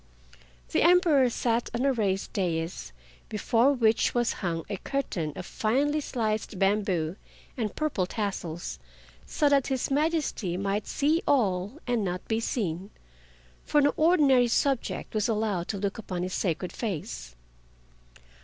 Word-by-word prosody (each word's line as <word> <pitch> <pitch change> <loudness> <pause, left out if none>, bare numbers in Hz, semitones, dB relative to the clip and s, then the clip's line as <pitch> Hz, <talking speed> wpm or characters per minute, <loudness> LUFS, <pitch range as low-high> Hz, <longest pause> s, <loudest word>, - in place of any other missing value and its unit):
The - - +1
Emperor 335 -7 +5
sat 235 0 0
on 245 +3 0
a 275 - +3
raised 195 -5 -1
dais, 165 - -2 0.4
before 230 +4 +3
which 230 -3 +2
was 240 -1 +2
hung 165 -3 -2
a 200 - -3
curtain 185 - -2
of - - -6
finely 285 +10 0
sliced 220 -6 -2
bamboo 195 -4 +1 0.4
and 220 -5 -3
purple 280 -13 -1
tassels, 180 - -4 0.5
so 295 - +1
that 280 -2 +3
His 265 0 -1
Majesty 290 - 0
might 200 +2 -1
see 310 +4 +1
all 205 -3 +1
and 240 -3 0
not 180 -1 -3
be 220 0 +1
seen, 195 -5 -2 0.7
for 295 - +2
no 285 0 +4
ordinary 290 -7 +4
subject 270 +2 0
was 215 -2 +1
allowed 210 -5 0
to 205 - -3
look 200 +2 -2
upon 180 -5 -4
his 185 - -3
sacred 175 0 -1
face. 60 - -5
215 Hz, 140 wpm, -28 LUFS, 185-270 Hz, 0.7 s, Emperor